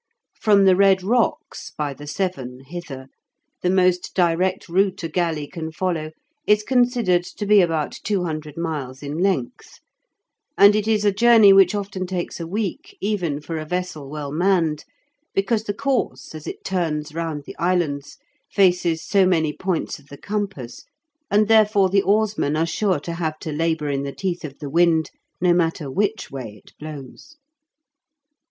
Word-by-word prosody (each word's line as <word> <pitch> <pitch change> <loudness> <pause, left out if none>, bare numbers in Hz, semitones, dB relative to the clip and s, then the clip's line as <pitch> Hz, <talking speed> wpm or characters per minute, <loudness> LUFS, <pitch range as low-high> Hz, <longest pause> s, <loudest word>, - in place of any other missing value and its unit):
From 200 -2 +3
the 190 -1 +6
Red 190 -1 +4
Rocks 245 - -1
(by 145 -2 -2
the 145 +2 -11
Severn) 140 -8 -4
hither, 135 -3 -8 0.6
the 180 - +1
most 185 -1 +2
direct 180 +1 +1
route 190 +1 +1
a - - -1
galley 165 -3 -1
can 160 +1 -6
follow 160 -2 -2 0.4
is 210 0 +4
considered 240 -8 +2
to 205 - -3
be 205 0 +6
about 160 -4 -1
200 160 -7 -3
miles 145 -6 -4
in 145 +3 -4
length, 180 -10 -2 0.8
and 200 +1 +7
it 215 0 0
is 215 -2 +2
a 205 - +5
journey 225 -2 +7
which 195 0 +5
often 195 -2 -4
takes 180 -1 -4
a 165 - -5
week 225 - -4
even 180 -9 -1
for 160 +2 -5
a - - -4
vessel 180 -4 -4
well 145 -1 -5
manned, 165 -2 +1 0.5
because 210 +3 0
the 205 - -1
course, 265 -1 -2
as 155 -1 -9
it - - -7
turns 155 -5 -2
round 160 -3 -4
the - - -9
islands, 165 -6 -1 0.3
faces 175 -4 +2
so 195 -3 +3
many 160 -4 +1
points 185 -3 -3
of 140 - -22
the 140 - -11
compass, 195 - -5 0.5
and 210 +1 +3
therefore 210 -3 +4
the 195 0 +4
oarsmen 205 -7 +1
are 160 +1 +1
sure 185 0 0
to 170 +4 -6
have 160 -2 -3
to 155 - -6
labour 160 -1 -1
in 140 -1 -1
the 140 0 -4
teeth 180 -3 -3
of 140 -3 -8
the 150 - -7
wind, 165 -1 +3 0.3
no 180 0 +3
matter 165 -5 0
which 210 +7 -1
way 115 -6 -7
it - - -18
blows. 150 - -10
175 Hz, 165 wpm, -22 LUFS, 155-200 Hz, 0.8 s, and